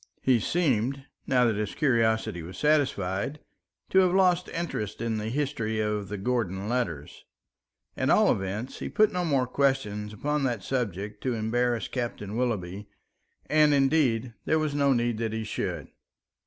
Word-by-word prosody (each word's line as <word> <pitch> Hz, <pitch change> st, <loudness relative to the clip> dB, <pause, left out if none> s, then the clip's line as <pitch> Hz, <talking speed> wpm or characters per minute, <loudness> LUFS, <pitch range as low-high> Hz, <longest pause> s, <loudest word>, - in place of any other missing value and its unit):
He 130 Hz, -3 st, +4 dB
seemed, 135 Hz, -, 0 dB, 0.2 s
now 125 Hz, -2 st, +4 dB
that 110 Hz, -3 st, +1 dB
his 105 Hz, -1 st, -3 dB
curiosity 115 Hz, -, +1 dB
was 90 Hz, +3 st, -9 dB
satisfied, 140 Hz, -5 st, +1 dB, 0.5 s
to 190 Hz, -, +6 dB
have 185 Hz, -1 st, +4 dB
lost 180 Hz, -2 st, +3 dB
interest 165 Hz, -, -4 dB
in 115 Hz, -1 st, -1 dB
the 105 Hz, +1 st, -3 dB
history 115 Hz, -5 st, -1 dB
of 105 Hz, -2 st, -1 dB
the 105 Hz, -, -4 dB
Gordon 100 Hz, -3 st, -1 dB
letters. 95 Hz, -, -3 dB, 0.7 s
At -, -, 0 dB
all -, -, +5 dB
events, 100 Hz, +6 st, -3 dB
he -, -, -4 dB
put 215 Hz, 0 st, +3 dB
no 180 Hz, 0 st, 0 dB
more 140 Hz, -6 st, +2 dB
questions 125 Hz, -6 st, 0 dB
upon 150 Hz, +7 st, -1 dB
that 120 Hz, -7 st, -2 dB
subject 105 Hz, -5 st, -3 dB
to 125 Hz, -2 st, -1 dB
embarrass 120 Hz, +1 st, 0 dB
Captain 115 Hz, -5 st, -4 dB
Willoughby, 105 Hz, -5 st, -2 dB, 0.6 s
and 150 Hz, -1 st, +4 dB
indeed 135 Hz, -5 st, +2 dB
there 160 Hz, -, +2 dB
was 155 Hz, -2 st, -1 dB
no 140 Hz, -1 st, +3 dB
need 120 Hz, -3 st, +1 dB
that 115 Hz, -1 st, -2 dB
he 110 Hz, 0 st, -2 dB
should. 105 Hz, -, -4 dB
120 Hz, 155 wpm, -27 LUFS, 105-140 Hz, 0.7 s, to